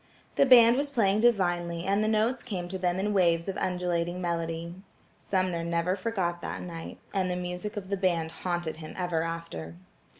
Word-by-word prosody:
The 275 Hz, -, +4 dB
band 240 Hz, -1 st, +8 dB
was 285 Hz, +1 st, 0 dB
playing 210 Hz, -7 st, +2 dB
divinely 175 Hz, -7 st, +2 dB
and 200 Hz, +3 st, +1 dB
the -, -, +1 dB
notes 220 Hz, +4 st, +1 dB
came 185 Hz, -7 st, -4 dB
to 190 Hz, +1 st, -4 dB
them 180 Hz, 0 st, 0 dB
in 205 Hz, +2 st, 0 dB
waves 170 Hz, -3 st, +3 dB
of 195 Hz, -, -2 dB
undulating 180 Hz, -1 st, -1 dB
melody. 170 Hz, -1 st, -2 dB, 0.5 s
Sumner 185 Hz, -3 st, -1 dB
never 170 Hz, +2 st, 0 dB
forgot 185 Hz, -4 st, -2 dB
that -, -, -5 dB
night, 165 Hz, -2 st, -7 dB, 0.2 s
and 190 Hz, -2 st, +1 dB
the 180 Hz, -, -1 dB
music 180 Hz, +3 st, -4 dB
of 190 Hz, -2 st, -5 dB
the 200 Hz, -, 0 dB
band 170 Hz, -4 st, 0 dB
haunted 175 Hz, -3 st, -3 dB
him 155 Hz, -1 st, -9 dB
ever 175 Hz, -3 st, 0 dB
after. 165 Hz, -, -5 dB
180 Hz, 180 wpm, -28 LUFS, 170-200 Hz, 0.5 s, band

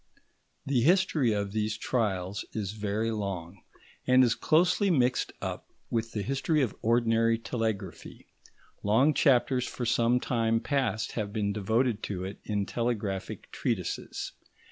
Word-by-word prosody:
The 135 Hz, -3 st, +2 dB
history 160 Hz, -5 st, +3 dB
of 100 Hz, -1 st, -1 dB
these 105 Hz, 0 st, -1 dB
trials 100 Hz, -6 st, -1 dB
is 100 Hz, -3 st, -3 dB
very 105 Hz, +1 st, -2 dB
long, 100 Hz, -4 st, -4 dB, 0.5 s
and 130 Hz, 0 st, +6 dB
is 120 Hz, -2 st, +3 dB
closely 180 Hz, -, +3 dB
mixed 130 Hz, -7 st, +2 dB
up -, -, -5 dB, 0.2 s
with 115 Hz, -1 st, -1 dB
the 105 Hz, -, -2 dB
history 135 Hz, +4 st, +1 dB
of 120 Hz, -, -2 dB
ordinary 115 Hz, 0 st, +3 dB
telegraphy; 110 Hz, -6 st, -4 dB, 0.6 s
long 130 Hz, +9 st, +4 dB
chapters 130 Hz, -3 st, +3 dB
for 125 Hz, -, -4 dB
some 120 Hz, +1 st, +3 dB
time 115 Hz, -2 st, +1 dB
past 130 Hz, -5 st, -1 dB
have 105 Hz, -3 st, -3 dB
been 100 Hz, -2 st, -1 dB
devoted 110 Hz, +2 st, +1 dB
to 95 Hz, -3 st, -4 dB
it 95 Hz, +2 st, -6 dB
in 105 Hz, -2 st, -1 dB
telegraphic 105 Hz, -5 st, -3 dB
treatises. -, -, -3 dB
115 Hz, 135 wpm, -29 LUFS, 105-125 Hz, 0.6 s, and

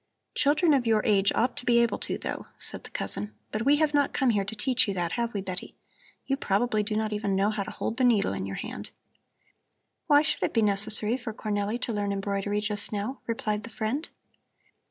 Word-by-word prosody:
"Children 300 Hz, +3 st, +3 dB
of 255 Hz, -4 st, +2 dB
your 220 Hz, -1 st, +3 dB
age 200 Hz, -2 st, +4 dB
ought 245 Hz, +2 st, +1 dB
to -, -, -3 dB
be 245 Hz, -1 st, +3 dB
able 235 Hz, -1 st, +2 dB
to, -, -, -2 dB
though," -, -, -5 dB
said -, -, -5 dB
the -, -, -10 dB
cousin. 210 Hz, +1 st, 0 dB, 0.2 s
"But 215 Hz, +2 st, -2 dB
we 285 Hz, +1 st, +6 dB
have 300 Hz, 0 st, +2 dB
not 285 Hz, -1 st, +2 dB
come 265 Hz, -3 st, +2 dB
here 205 Hz, -3 st, +1 dB
to 205 Hz, +3 st, -6 dB
teach 250 Hz, +3 st, +2 dB
you 200 Hz, -, -2 dB
that; 175 Hz, -2 st, -1 dB
have 235 Hz, -1 st, -1 dB
we, 200 Hz, -, -1 dB
Betty? 185 Hz, -1 st, -5 dB, 0.5 s
You 270 Hz, -, 0 dB
probably 215 Hz, -1 st, +1 dB
do 210 Hz, +1 st, -2 dB
not 215 Hz, 0 st, -1 dB
even 205 Hz, -2 st, -1 dB
know 200 Hz, +2 st, +2 dB
how 210 Hz, -1 st, -2 dB
to 195 Hz, -, -4 dB
hold 225 Hz, -, -4 dB
the 260 Hz, -, +1 dB
needle 220 Hz, -, +3 dB
in 95 Hz, 0 st, -3 dB
your 95 Hz, -, -5 dB
hand." -, -, -6 dB, 1.2 s
"Why 290 Hz, 0 st, +6 dB
should -, -, -1 dB
it -, -, -1 dB
be 225 Hz, -, +4 dB
necessary 210 Hz, +3 st, +3 dB
for 235 Hz, -4 st, -6 dB
Cornelli 210 Hz, +2 st, -2 dB
to 235 Hz, -, -1 dB
learn 205 Hz, -1 st, -1 dB
embroidery 200 Hz, +1 st, -1 dB
just 210 Hz, -1 st, -2 dB
now?" 215 Hz, +6 st, -3 dB
replied 215 Hz, -2 st, -1 dB
the 230 Hz, -, -9 dB
friend. 230 Hz, +8 st, -3 dB
215 Hz, 220 wpm, -27 LUFS, 205-245 Hz, 1.2 s, we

